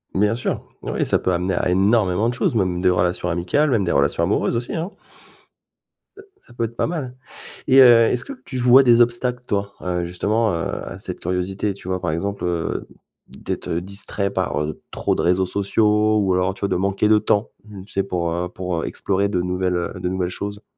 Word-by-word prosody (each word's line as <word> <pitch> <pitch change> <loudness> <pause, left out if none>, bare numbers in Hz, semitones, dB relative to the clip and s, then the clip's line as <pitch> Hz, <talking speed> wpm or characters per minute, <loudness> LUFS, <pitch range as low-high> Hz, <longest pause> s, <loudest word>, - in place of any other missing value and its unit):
Bien 105 +3 +3
sûr. 120 - -2 0.2
Oui, - - -2
ça - - +2
peut 95 - 0
amener 90 +2 0
à 90 - 0
énormément 100 +2 +2
de 125 - -2
choses, 140 +2 0
même 90 -4 0
des 90 - +4
relations 90 0 0
amicales, 90 - +1
même 115 -7 +2
des 85 - 0
relations 70 +4 +2
amoureuses 105 +5 +1
aussi, 120 - -4
hein. 165 +3 -3 1.3
Heu, 405 - -12 0.2
ça 120 - -17
peut 120 - -3
être 115 +1 -8
pas - - 0
mal 140 -8 -4 0.5
et 135 +1 +7
heu, 130 - +10 0.3
est-ce 125 - 0
que 280 - -7
tu 130 - -5
vois 125 +2 +7
des 120 -2 +5
obstacles, 125 +1 +1
toi? 100 0 -2
Heu, 90 -1 -2
justement, 105 +5 0
heu, 85 -1 -3
à - - -8
cette - - -7
curiosité, 95 +3 -2
tu 95 - -11
vois? 95 0 -1
Par - - -2
exemple, 100 +5 -3
heu, 85 -2 -2 0.4
d'être, - - -6
heu, 85 - -1
distrait 100 +1 -4
par, 95 -5 -1
heu, 75 0 -5
trop - - -1
de - - -1
réseaux 90 +2 +2
sociaux 105 +2 +2
ou 95 -3 +2
alors, 90 +1 +1
tu - - -16
vois, 100 - 0
de - - 0
manquer 100 +3 +1
de 110 - +6
temps, 105 +1 0 0.4
tu - - -14
sais, 100 - +1
pour, 85 -3 -2
heu, 90 +1 -2
pour, 90 -2 -3
heu, - - -2
explorer 100 +1 -1
de 95 -3 0
nouvelles, 90 0 -1
heu, 85 - -2
de 90 - -1
nouvelles 90 -1 -1
choses. 100 +2 -6
100 Hz, 220 wpm, -21 LUFS, 90-110 Hz, 1.3 s, heu